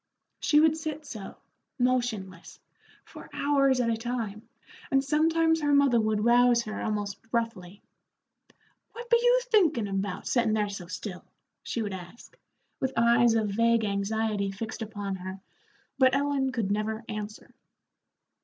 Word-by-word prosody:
She 300 - +4
would 315 0 +4
sit 310 -1 -5
so, 215 -8 -8 0.4
motionless, 240 -8 -2 0.5
for - - -12
hours 275 -2 +2
at 235 -2 +1
a - - +1
time, 225 -2 -5 0.4
and 270 -1 +2
sometimes 320 +2 +2
her 290 -1 +3
mother 270 -5 +4
would 215 0 0
rouse 240 0 +5
her 215 -1 -5
almost 205 -2 -3
roughly. 210 -5 -3 1.1
"What 475 +1 -9
be 470 - +6
you - - +5
thinkin' 340 - +2
about, 195 -1 -3
settin' 235 -3 +1
there 210 -1 0
so 195 -3 -7
still?" 185 0 -7 0.4
she 230 - -3
would 205 -2 -4
ask, 180 +5 -11 0.4
with 265 0 -1
eyes 235 0 +4
of 220 -2 +1
vague 230 +2 +2
anxiety 205 0 -1
fixed 220 +4 -6
upon 205 -3 -4
her, 190 +1 -7 0.6
but 260 0 +5
Ellen 275 -1 0
could 225 -6 -2
never 215 +2 -2
answer. 210 -1 -7
230 Hz, 145 wpm, -28 LUFS, 205-270 Hz, 1.1 s, be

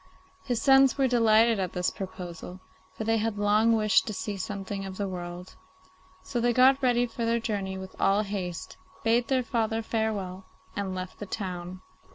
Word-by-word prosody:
His 245 -4 -1
sons 270 0 +5
were 270 -1 +3
delighted 230 -2 +4
at 185 -2 -2
this 180 0 0
proposal, 180 -1 -7 0.4
for - - -3
they 225 +1 +2
had 220 -1 -1
long 210 +2 +3
wished 215 -1 +3
to 215 - -3
see 205 +1 -4
something 195 0 -5
of 190 -1 -7
the 200 - -2
world, 180 0 -7 0.7
so 240 - -3
they 240 0 +2
got 265 +3 +5
ready 245 -2 +3
for 235 0 -5
their 230 +1 +1
journey 200 -4 -3
with 190 0 -9
all 200 +2 +3
haste, 190 -4 -5 0.3
bade 230 +1 +2
their 260 -2 +1
father 225 -1 -1
farewell, 205 -5 -2 0.3
and 195 -2 -3
left 185 0 -6
the 205 - -6
town. 185 -2 -5
210 Hz, 180 wpm, -27 LUFS, 190-230 Hz, 0.7 s, sons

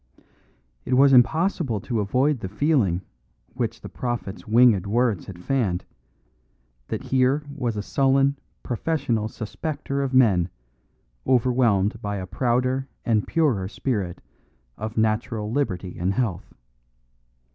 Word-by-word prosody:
It 130 - 0
was 135 +1 +6
impossible 150 - +3
to 115 +1 -2
avoid 130 +7 +1
the 95 - -5
feeling 105 - +1 0.5
which 115 -2 -3
the - - -7
prophet's 120 -5 -5
winged 110 -4 +5
words 115 -3 +1
had 95 - -8
fanned, 100 -9 0 1.0
that - - -4
here 130 +3 +2
was 120 -6 -2
a 105 - -2
sullen, 135 +3 +2 0.2
professional 120 -4 -1
suspecter 140 +6 -4
of 135 - -2
men 100 -9 +4 0.8
overwhelmed 120 -4 +2
by 100 -1 -3
a 95 -2 -4
prouder 125 +6 0 0.2
and 110 -3 +1
purer 130 - +1
spirit 100 -5 -3 0.5
of 110 +1 -6
natural 110 0 0
liberty 95 -10 -2
and 95 +3 0
health. 105 -8 -2
120 Hz, 120 wpm, -24 LUFS, 105-135 Hz, 1.0 s, was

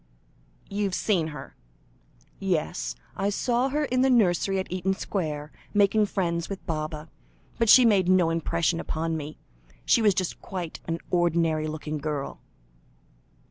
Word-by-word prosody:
"You've 200 -2 -1
seen 180 -7 +1
her?" 150 -3 -9 0.8
"Yes; 160 - -1 0.2
I 195 +1 0
saw 240 +5 +1
her 295 +2 0
in 255 -2 +1
the 265 - +4
nursery 195 -5 +3
at 190 - -3
Eaton 185 +1 0
Square, 155 -7 -3 0.2
making 205 +1 +4
friends 170 -4 -1
with 195 -1 -6
Baba, 155 -2 -4 0.5
but 230 -2 +2
she 255 +2 +9
made 195 -5 +4
no 180 -3 +4
impression 165 0 0
upon 165 0 -2
me; 155 0 -6 0.5
she 235 - +4
was 205 -3 +4
just 185 -2 -2
quite 180 -4 -6
an 165 0 -1
ordinary 165 -3 +2
looking 155 0 -4
girl." 145 -1 -4
175 Hz, 140 wpm, -26 LUFS, 155-200 Hz, 0.8 s, she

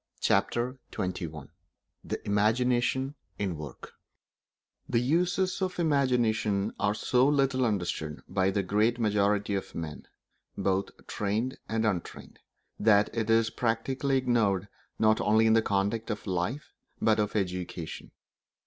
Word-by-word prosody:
Chapter 120 +6 +1
XXI 80 -6 -4 0.5
The - - -4
Imagination 125 +6 +2 0.2
in 95 -4 -2
Work 75 -5 -9 1.0
The - - +1
uses 180 +8 +1
of 185 -1 -1
the 175 - 0
imagination 120 -8 +1
are 100 0 +1
so 125 +4 +2
little 135 -3 +2
understood 85 -8 -2
by 95 0 +1
the 100 +1 0
great 105 +5 +2
majority 105 -2 +1
of 95 - -4
men, 80 -3 -6 0.5
both 95 0 -1
trained 110 +6 -2
and 110 0 0
untrained, 95 -6 -3 0.4
that 105 0 +4
it 115 -1 -1
is 115 0 +3
practically 130 +4 0
ignored 110 -7 +1 0.3
not 110 0 +3
only 110 +2 +4
in 110 - +5
the 115 - +5
conduct 105 +3 -1
of 105 -1 -4
life, 100 - -3 0.3
but 110 -1 +3
of 105 0 -1
education. 90 -4 -3
110 Hz, 130 wpm, -29 LUFS, 100-125 Hz, 1.0 s, in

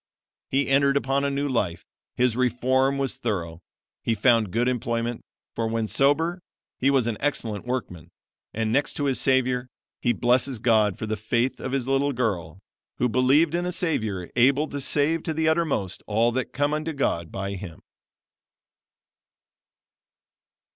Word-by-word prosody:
He 135 +1 +1
entered 140 +1 +3
upon 140 0 0
a 140 - +1
new 140 +1 -1
life. 100 -10 -2 0.3
His 125 -2 +2
reform 130 +2 +1
was 135 -1 -1
thorough. 85 -7 -3 0.4
He 115 - 0
found 115 -1 +3
good 115 +6 0
employment, 120 -1 -2 0.3
for 115 - -1
when 115 0 -1
sober 145 - +1 0.4
he 135 - +3
was 135 -4 +3
an 115 -2 -2
excellent 115 -7 -2
workman; 115 -11 -4 0.4
and 110 0 -2
next 140 +2 +1
to 145 - -2
his 135 -2 +2
Savior, 125 -1 +2 0.3
he 120 - +1
blesses 125 +2 +2
God 110 -4 +2
for - - -4
the 110 0 -2
faith 115 +4 -1
of 130 - -4
his 135 -2 -1
little 135 +1 +1
girl, 95 -10 -2 0.4
who 125 - +2
believed 135 +7 +3
in 175 +1 -1
a - - -1
Savior 110 - -1
able 135 +5 +3
to 140 - -4
save 150 +4 +2
to 160 -1 -3
the 160 0 +1
uttermost 155 - 0
all 115 +3 +2
that 130 +1 -1
come 145 +1 0
unto 155 +1 -2
God 85 - -1
by 100 0 -4
him." 90 -4 -9
125 Hz, 160 wpm, -25 LUFS, 110-140 Hz, 0.4 s, entered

